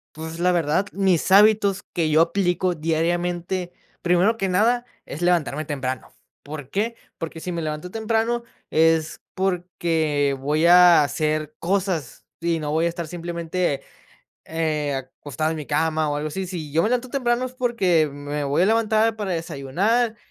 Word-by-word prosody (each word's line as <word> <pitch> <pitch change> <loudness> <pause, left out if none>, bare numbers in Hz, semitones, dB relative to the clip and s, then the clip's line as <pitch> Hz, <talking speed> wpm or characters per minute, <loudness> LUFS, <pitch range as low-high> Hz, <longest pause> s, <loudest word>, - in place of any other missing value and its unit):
Pues, 160 +1 -7
la 180 +1 +3
verdad, 170 +3 +1
mis 190 -2 +1
hábitos 205 -1 +5
que 165 -2 0
yo 155 +1 +5
aplico 180 +1 +1
diariamente, 175 +3 -1 0.3
primero 180 +6 +3
que 195 -3 -1
nada, 235 +6 +2 0.2
es 150 - -7
levantarme 155 -4 +1
temprano, 130 -3 -4 0.3
¿por 145 -2 -8
qué?, 225 +4 -1 0.2
porque 165 0 -5
si 180 +2 -5
me 170 - -3
levanto 155 +3 -4
temprano 225 +1 0 0.3
es 160 0 +2
porque 165 -6 0
voy 150 +4 +1
a 175 -3 +7
hacer 155 +1 -1
cosas 185 -6 -2 0.2
y 170 -1 0
no 150 -1 -3
voy 160 +2 +1
a - - +2
estar 170 -1 -5
simplemente, 170 -3 -2 0.6
eh, 155 -3 -1
acostado 145 +3 -4
en 160 - -3
mi 150 - -6
cama 155 +1 0
o 145 - -1
algo 150 +1 -2
así. 190 +5 -4
Si 170 -5 -6
yo 160 +3 +2
me 215 - +2
levanto 250 0 0
temprano 245 -1 0
es 255 - -11
porque 195 - +2
me 145 +1 -4
voy 140 +4 +1
a - - +4
levantar 220 0 +2
para 205 -3 -3
desayunar 175 - 0
170 Hz, 165 wpm, -23 LUFS, 155-195 Hz, 0.6 s, a